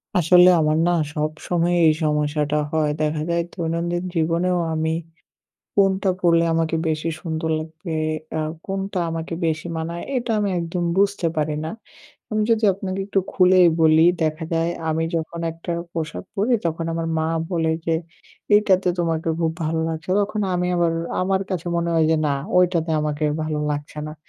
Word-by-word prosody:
আসলে 180 +1 +6
আমার 155 0 +2
না - - +3 0.2
সবসময় 160 +3 -1
এই 155 - +5
সমস্যাটা 150 0 0
হয়। 155 -2 +1
দেখা 150 0 0
যায় 170 0 +1
দৈনন্দিন 170 +1 -2
জীবনেও 170 +3 +1 0.2
আমি 160 0 0 0.8
কোনটা 195 -1 +3
পড়লে 170 -2 +4
আমাকে 165 0 0
বেশি 155 +1 -1
সুন্দর 160 -1 -3
লাগবে, 160 +2 -7 0.4
আ - - 0 0.3
কোনটা 195 -1 -3
আমাকে 165 +1 -4
বেশি 160 +1 -1
মানায় 170 +2 -4
এটা 240 -2 -1
আমি 205 -1 0
একদম 170 +1 -3
বুঝতে 200 -3 +2
পারি 150 0 0
না। - - -3 0.6
আমি 215 - +1
যদি 225 0 +2
আপনাকে 190 0 -4
একটু 195 -1 +1
খুলেই 185 -1 +5 0.2
বলি 160 0 +6 0.2
দেখা 155 +1 -1
যায় 165 +1 +1 0.2
আমি 160 +1 0
যখন 165 +1 -3
একটা 165 +1 -6 0.2
পোশাক 160 -2 -4
পরি 215 +5 +1
তখন 165 0 -1
আমার 165 0 -2
মা 160 - 0 0.3
বলে 160 -2 +1
যে 165 - +1 0.6
এইটাতে 190 -3 +3
তোমাকে 165 -1 0
খুব 165 -1 +1
ভালো 160 +1 -1
লাগছে। 160 +2 -6
তখন 210 +1 -2
আমি 180 0 0
আবার 170 -1 +2 0.3
আমার 190 +1 +1
কাছে 175 -2 -3
মনে 170 0 0
হয় 160 -1 +3
যে - - +4
না, 140 - +1 0.2
ওইটাতে 175 -2 +2
আমাকে 150 0 -2 0.2
ভালো 155 -1 -2
লাগছে 145 +1 -5
না। 155 - -7
165 Hz, 165 wpm, -22 LUFS, 160-180 Hz, 0.8 s, আসলে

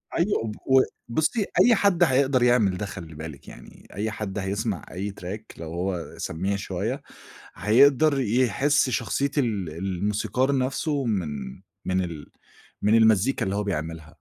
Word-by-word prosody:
أيوه 195 +5 +1
وب 110 -1 -4
و 130 0 +6 0.3
بُصّي 155 - 0
أي 240 -2 +6
حد 195 -3 +3
هيقدَر 130 -3 +3
يعمل 110 -7 +3
ده 105 - -3
خلّي 85 -5 -8
بالِك 80 -3 -9
يعني، - - -14
أي 105 +3 -2
حد 105 -2 -5
هيسمع 100 -1 -2
أي 100 +2 -4
track 100 +5 -5 0.2
لو 80 0 -6
هو 90 -1 -3
سمّيع 95 +5 -2
شوية 100 +6 -3 0.5
هيقدَر 135 - +4
يحس 130 +4 +2
شخصية 130 +4 0
ال 105 - 0
الموسيقار 100 - -1
نَفْسه 135 +2 -1
من، 75 - -2 0.3
من 95 0 0
ال 80 -4 -8 0.5
من 105 +2 +4
المزّيكا 110 +2 +4
اللي 95 +1 -2
هو 105 - -1
بيعملها. 80 -4 -4
105 Hz, 150 wpm, -25 LUFS, 90-130 Hz, 0.5 s, و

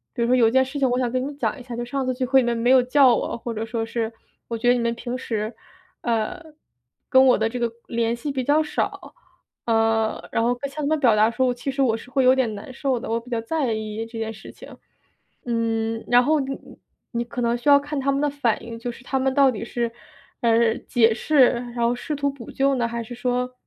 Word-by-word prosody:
比 240 - -2
如 - - +1
说 250 - +4
有 240 -3 +5
一 - - +1
件 260 +1 +4
事 270 +2 -6
情 265 -2 +2
我 245 - +1
想 245 -2 0
跟 255 +1 -1
你 290 - -6
讲 285 0 -2
一 - - -10
下， 245 -1 -7
就 240 - -3
“上 270 +3 -2
次 255 - 0
聚 255 0 -1
会 265 +1 +4
你 - - -1
们 240 - +1
没 235 +2 +1
有 260 -1 +7
叫 255 0 +5
我”， - - -3
或 235 0 -5
者 220 0 -3
说 225 0 -3
是” 230 0 -3 0.4
我 230 - -3
觉 235 +2 -2
得 - - +6
你 245 - 0
们 235 0 0
平 240 +1 -5
时， 220 -2 -3 0.5
呃， 230 +5 -1 0.7
跟 260 0 +6
我 255 - +5
的 220 +1 0
这 250 +2 -5
个 235 -1 0 0.2
联 230 0 0
系 260 +5 -4
比 265 -2 -2
较 290 +4 +3
少”， 305 - -3 0.5
嗯， 225 -1 +1
然 230 - +1
后 245 +1 +2
向 275 +2 -15
他 - - 0
们 310 +1 +1
表 240 -6 +4
达 215 +1 +4
出， 255 +1 +1
其 245 +3 -4
实 275 +1 -2
我 230 -4 +2
是 235 - -13
会 265 0 +2
有 255 0 +6
点 250 -5 0
难 205 +5 -9
受 265 -2 -1
的， - - -7
我 230 +1 0
比 235 +2 -15
较 230 -1 -1
在 265 -1 -1
意 215 +1 -4
这 230 0 -9
件 220 0 -3
事 215 - -12
情。 - - -13 0.7
嗯， 225 -1 -1
然 245 +1 +5
后 310 +3 +2
你 270 0 -3 0.6
你 235 -1 -1
可 245 +1 -5
能 235 0 +1
需 240 - -8
要 285 0 +8
看 290 0 -4
他 275 +1 +1
们 275 - 0
的 295 - +2
反 260 -6 -1
应， 230 -1 -7
就 240 +1 -4
是 240 - -14
他 265 - -2
们 265 0 +1
到 275 -1 +5
底 225 -1 -5
是， 235 -1 -2 0.5
呃， 230 -1 +3
解 230 -2 +3
释， 275 -1 +4 0.3
然 - - -8
后 235 0 +2
试 295 +5 -4
图 285 0 0
补 270 -5 -11
救 275 0 +1
呢， 240 -2 0
还 235 0 -4
是 230 - -9
说 250 +1 -1
245 Hz, 280 characters per minute, -23 LUFS, 230-265 Hz, 0.7 s, 要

